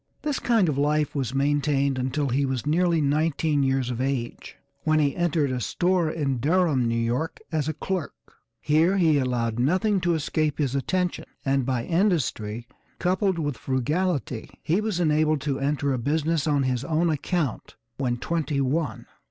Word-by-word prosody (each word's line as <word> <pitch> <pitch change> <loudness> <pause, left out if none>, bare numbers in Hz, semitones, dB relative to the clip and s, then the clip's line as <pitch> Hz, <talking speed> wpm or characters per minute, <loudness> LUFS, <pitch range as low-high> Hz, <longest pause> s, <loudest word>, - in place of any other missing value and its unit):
This 295 -2 -1
kind 225 -6 +2
of 145 -3 0
life 150 0 +1
was 135 -3 -2
maintained 140 -1 +1
until 130 +3 -1
he 135 +3 +1
was 130 -3 -2
nearly 165 +1 +2
nineteen 150 0 +1
years 135 -2 +1
of 125 0 -3
age 130 -3 -3 0.3
when 155 0 +2
he 145 -3 +2
entered 160 -5 +1
a 125 -1 -2
store 175 - +1
at 140 -6 -2
Durham, 155 -4 +2
New 115 - 0
York, 120 +8 -1
as 155 -3 -1
a - - -1
clerk. 180 0 -3 0.4
Here 165 +6 +3
he 160 -5 +4
allowed 120 -3 -1
nothing 185 - +2
to 175 -1 +2
escape 155 -1 -1
his 140 -4 0
attention 180 +7 -1 0.2
and, 135 -2 +1
by 125 -3 0
industry, 135 - 0 0.3
coupled 185 +1 +1
with 145 -5 -2
frugality, 135 -1 -1
he 175 +7 +1
was 215 -5 -2
enabled 155 -2 +2
to 140 -2 -2
enter 140 0 0
a 130 - -1
business 155 +4 0
on 145 -2 +2
his 130 -1 -1
own 165 +2 +1
account 155 -2 -2 0.2
when 125 -3 -1
twenty 155 +1 -1
one. 145 +4 -1
145 Hz, 170 wpm, -25 LUFS, 135-165 Hz, 0.4 s, he